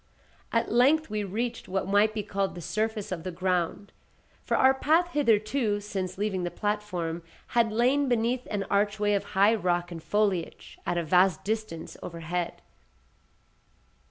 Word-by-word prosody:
At 230 - 0
length 275 +6 +4
we 210 -1 -1
reached 230 +5 -3
what 190 0 -2
might 205 +2 +4
be 210 - -2
called 195 -2 -2
the - - -7
surface 215 +3 -2
of 180 -3 -3
the 185 - -5
ground; 180 +2 -1 0.5
for - - 0
our 265 0 +6
path 320 +6 +2
hitherto, 220 -5 +2
since 195 -3 -4
leaving 195 -3 -1
the 175 - -1
platform, 185 -5 -2 0.3
had 230 -2 +2
lain 255 +5 +2
beneath 240 +1 0
an 205 -2 -1
archway 205 +1 +1
of 200 - +1
high 200 +3 +6
rock 175 -4 0
and 165 -1 -6
foliage, 200 -3 -1
at 175 - 0
a 170 - 0
vast 180 +1 +3
distance 215 -6 -4
overhead. 170 +1 -4
205 Hz, 155 wpm, -28 LUFS, 180-225 Hz, 0.5 s, our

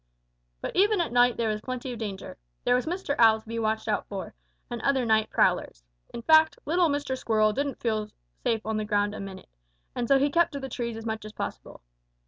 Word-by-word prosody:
"But - - -5
even 410 +2 +4
at 340 - 0
night 245 0 +4
there 230 -2 0
was 215 0 -2
plenty 255 +1 -5
of 235 - -8
danger. 200 -4 -6 0.3
There 245 - +3
was 250 +4 +1
Mr. 355 -3 -2
Owl 220 -1 +6
to 220 - -22
be 230 +1 -3
watched 220 0 -1
out 210 -1 -1
for, 195 -2 -6 0.3
and 240 -2 -5
other 270 -3 +2
night 220 -1 +2
prowlers. - - +1 0.3
In 235 - -7
fact, 315 +2 +5
little 340 +2 +3
Mr. 285 -2 -1
Squirrel 215 -4 +2
didn't 280 0 -2
feel 215 -2 -1 0.3
safe 225 -1 0
on 220 0 -1
the 215 - -1
ground 205 -1 +1
a - - -7
minute, 195 -1 -8 0.4
and 240 -1 -2
so 275 - +5
he 280 +1 +2
kept 340 +1 +3
to 280 - -4
the 270 -1 -6
trees 235 -2 -4
as 225 - -8
much 220 -1 -3
as 215 0 -9
possible. - - -6
235 Hz, 225 wpm, -27 LUFS, 215-275 Hz, 0.4 s, Owl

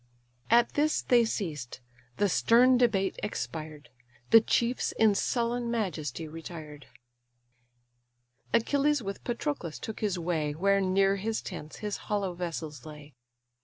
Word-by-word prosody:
At 235 +1 +4
this 300 +1 +1
they 240 -2 +4
ceased: 150 - -4 0.4
the 205 - +3
stern 245 +7 +5
debate 210 -6 +1
expired: 155 -8 -5 0.4
The 225 0 +9
chiefs 235 +2 0
in 220 -2 +4
sullen 235 +3 -1
majesty 170 - -3
retired. 155 -2 -9 1.6
Achilles 280 +3 +2
with 195 0 -6
Patroclus 240 - -3
took 220 - -7
his 205 -4 -1
way 165 -4 -1
Where 195 +4 +2
near 195 +1 +2
his 220 +3 -2
tents 155 -5 -7
his 210 - -2
hollow 200 -3 -2
vessels 160 -6 -5
lay. 150 -1 -11
195 Hz, 125 wpm, -29 LUFS, 160-235 Hz, 1.6 s, The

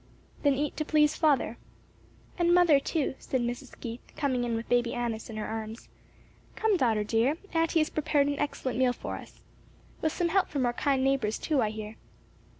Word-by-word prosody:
"Then 285 -2 +3
eat 290 +1 -2
to 310 - 0
please 300 -1 +3
father." 280 -7 +2 0.8
"And 345 0 +4
mother 340 -5 +6
too," 290 0 -1
said 260 - -1
Mrs. 240 +2 -5
Keith 235 +1 -6 0.2
coming 260 -4 0
in 235 -1 -1
with 225 +1 -4
Baby 245 -1 +1
Annis 235 -2 -3
in 220 - -6
her 215 - -3
arms. 220 +1 -6 0.7
"Come, 440 -2 +2
daughter, 225 - +2
dear, 230 +8 +1 0.2
auntie 330 0 +2
has 310 - -1
prepared 300 -2 +2
an 285 0 -1
excellent 260 -3 -2
meal 255 -1 +3
for - - -5
us. - - -13 0.6
With 315 - +1
some 345 +1 0
help 385 +2 +2
from 275 -4 0
our 240 - +1
kind 270 0 +1
neighbors 270 -6 +1
too, 295 -5 +1
I 215 - +1
hear." 215 0 -7
265 Hz, 190 wpm, -29 LUFS, 235-305 Hz, 0.8 s, mother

